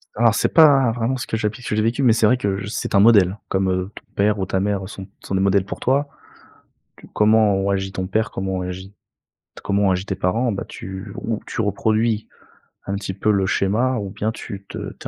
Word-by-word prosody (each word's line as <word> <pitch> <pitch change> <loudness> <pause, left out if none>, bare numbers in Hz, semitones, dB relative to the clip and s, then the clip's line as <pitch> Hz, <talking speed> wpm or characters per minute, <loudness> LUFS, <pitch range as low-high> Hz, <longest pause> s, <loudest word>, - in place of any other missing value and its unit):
Alors 115 0 +3
c'est - - 0
pas 140 -6 +6
vraiment 120 +3 -1
ce 130 - -4
que 110 - -2
j'applique 110 +2 -3
ce - - -5
que - - 0
j'ai 110 - +2
vécu, 115 +5 0
mais 125 - +5
c'est 110 - +2
vrai 125 +4 +4
que 100 -4 -2
c'est 105 - -3
un - - +6
modèle 100 -3 +5
comme, 95 0 0
heu, 90 +1 -2
ton - - -11
père 105 +1 +2
ou 95 - -1
ta 95 - -1
mère 100 -1 -1
sont 95 -3 -9
sont 95 - -4
des 95 - +1
modèles 100 0 +2
pour 95 - -7
toi. 140 +3 +1 0.9
Tu - - -15
comment 105 -1 +4
ont 95 +1 0
agi 95 -1 -1
ton 95 -1 -3
père, 105 +2 -1
comment 95 0 -3
ont - - -2
agit 95 +2 -7 0.7
comment 100 +1 +1
ont - - +3
agi 95 +1 -1
tes 95 - -2
parents, 100 +7 0
bah, 100 - -4
tu 95 +1 -8
ou 110 -1 -3
tu - - -4
reproduis 110 +1 0 0.6
un 100 - -2
petit 100 -1 -4
peu 105 +3 +1
le 100 -2 +2
schéma 115 +8 +1
ou 100 -3 -4
bien 105 +2 -2
tu 100 -3 -8
te - - -7 0.2
tu - - -9
100 Hz, 240 wpm, -21 LUFS, 95-110 Hz, 0.9 s, pas